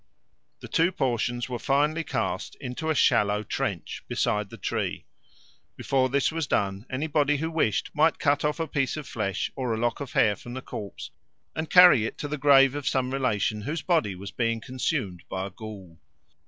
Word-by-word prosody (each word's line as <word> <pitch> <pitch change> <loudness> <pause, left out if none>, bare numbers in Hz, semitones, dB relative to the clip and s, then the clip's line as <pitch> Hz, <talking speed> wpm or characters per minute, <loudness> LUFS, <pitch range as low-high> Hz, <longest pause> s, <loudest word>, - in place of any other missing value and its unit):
The - - -8
two 170 +3 +2
portions 120 -4 -1
were 125 -2 -4
finally 150 +5 +1
cast - - -3
into 140 +6 -5
a 160 - +2
shallow 105 -5 +3
trench - - -3
beside 105 -1 0
the 115 - -10
tree. 95 - -3 0.7
Before 130 -1 +1
this 140 +3 +1
was 160 -2 -2
done, 100 +1 -1
anybody 150 +1 +1
who 160 +3 -3
wished 115 - 0
might 155 +1 +3
cut 145 -1 +1
off 150 +2 0
a 165 - 0
piece 140 -2 -1
of 150 -3 -6
flesh 105 -7 -2
or 125 -4 -1
a - - -4
lock 120 0 -1
of 140 -3 -6
hair 105 -2 +4
from 120 +3 -9
the 130 - -5
corpse 100 -2 -7 0.4
and 160 0 -3
carry 175 -11 +7
it - - -8
to 145 - -4
the 150 0 -4
grave 135 -1 +6
of 145 -1 -4
some 130 -1 0
relation 110 -5 0
whose 150 +9 -4
body 160 - +1
was 100 +2 -8
being 115 -1 0
consumed 125 - -3
by 95 0 -3
a 100 - -7
ghoul. 95 -5 -10
130 Hz, 190 wpm, -26 LUFS, 110-150 Hz, 0.7 s, carry